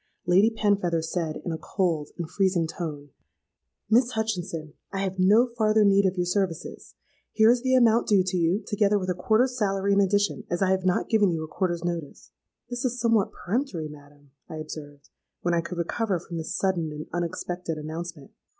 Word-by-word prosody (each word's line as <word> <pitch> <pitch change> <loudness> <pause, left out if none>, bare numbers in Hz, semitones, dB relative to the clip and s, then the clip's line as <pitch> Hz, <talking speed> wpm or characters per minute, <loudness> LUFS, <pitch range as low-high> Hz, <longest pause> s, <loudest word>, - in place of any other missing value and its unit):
Lady 185 +5 +5
Penfeather 200 -7 +1
said, 160 -1 -2
in 175 - -2
a 160 - -4
cold 165 -6 -1
and 170 -3 -4
freezing 185 -2 +1
tone, 155 -3 -6 0.8
'Miss 240 +3 +3
Hutchinson, 175 -8 -3 0.2
I 195 - -2
have 190 -1 -3
no 210 +6 +5
farther 215 -2 +3
need 200 0 +5
of 185 0 -2
your 180 - +1
services. 180 -3 -3 0.4
Here 220 +1 +6
is 245 0 +1
the 260 0 +2
amount 235 -2 +4
due 200 -3 +4
to 185 0 -2
you, 175 +4 +1
together 205 -1 +2
with 185 -2 -1
a - - +1
quarter's 230 +7 +2
salary 200 -3 +1
in 200 - +4
addition, 205 +2 +1
as 175 - -1
I 190 -1 +2
have 190 -1 0
not 185 - +1
given 210 -3 +3
you 165 -2 -2
a - - -6
quarter's 175 0 -2
notice.'—'This 175 - -7
is 250 -1 -1
somewhat 230 -4 +2
peremptory, 190 - -2
madam,' 145 -1 -16 0.2
I - - -6
observed, 150 -2 -9 0.3
when 175 - 0
I 170 - +2
could 170 +1 -7
recover 190 +3 -1
from 170 0 -7
this 160 - -4
sudden 175 -5 0
and 150 0 -6
unexpected 175 -1 -3
announcement. 155 -1 -7
185 Hz, 185 wpm, -26 LUFS, 165-210 Hz, 0.8 s, Here